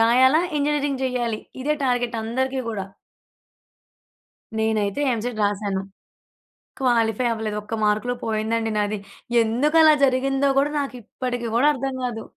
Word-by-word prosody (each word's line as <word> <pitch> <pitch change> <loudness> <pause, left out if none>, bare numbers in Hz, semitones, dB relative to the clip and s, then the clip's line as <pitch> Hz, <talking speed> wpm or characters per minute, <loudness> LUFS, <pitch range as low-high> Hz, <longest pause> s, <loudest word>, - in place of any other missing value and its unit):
రాయాల, 255 +5 +5 0.2
engineering 285 -2 0
చేయాలి. 240 -4 -1 0.2
ఇదే 300 +2 +1
target 245 -2 0
అందరికీ 260 +4 -1
కూడా. 200 -4 -3 1.7
నేనైతే 220 +1 0
ఎంసెట్ 230 0 -3
రాశాను. 200 -1 -1 1.0
క్వాలిఫై 240 -2 +2
అవ్వలేదు. 220 -2 -3
ఒక్క 215 +2 -8
మార్కులో 215 +4 +1
పోయిందండి 225 0 -1
నాది. 210 0 0 0.5
ఎందుకలా 300 +8 +4
జరిగిందో 270 +1 +1
కూడా 285 +2 +1
నాకిప్పటికీ 245 -2 -4
కూడా 255 +5 +4
అర్థం 270 0 -3
కాదు. 225 -3 -4
240 Hz, 110 wpm, -23 LUFS, 220-265 Hz, 1.7 s, రాయాల